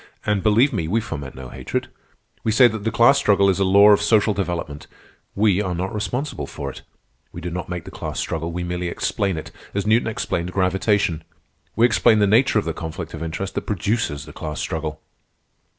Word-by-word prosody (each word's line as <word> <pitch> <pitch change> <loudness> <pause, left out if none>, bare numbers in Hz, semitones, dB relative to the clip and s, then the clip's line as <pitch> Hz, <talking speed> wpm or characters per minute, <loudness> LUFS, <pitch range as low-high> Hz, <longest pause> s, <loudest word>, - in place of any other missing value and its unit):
"And, 105 -2 +1
believe 115 +7 +3
me, 85 -7 -1
we 110 +7 +1
foment 70 -11 -6
no 65 -1 -9
hatred. - - -4 0.6
We 110 - +1
say 120 +3 +7
that 110 -2 -5
the 115 - +1
class 120 +6 +5
struggle 100 -1 +3
is 95 - -2
a - - +3
law 100 +2 +7
of 105 - +5
social 105 0 +3
development. 85 -7 -4 0.5
We 100 -1 +3
are 90 -3 -2
not 95 +3 -3
responsible 105 - -3
for - - -6
it. - - -12 0.5
We - - -8
do 85 0 -5
not 90 0 -5
make 90 -2 -5
the 95 - -9
class 75 -7 -5
struggle. 80 +1 -3
We 90 +1 -4
merely 90 0 -3
explain 95 +1 -1
it, 80 - -7 0.2
as 100 0 -1
Newton 110 +2 +3
explained 90 -5 -2
gravitation. 95 -3 +1 0.5
We 115 - +5
explain 115 -2 +4
the 105 - +4
nature 115 +4 +3
of 105 - +1
the 80 - -2
conflict 80 +1 -6
of 80 - -7
interest 85 +4 -4
that - - -4
produces 100 -7 -1
the 75 - -12
class 75 -2 -5
struggle." 80 -2 -3
95 Hz, 205 wpm, -22 LUFS, 85-105 Hz, 0.6 s, say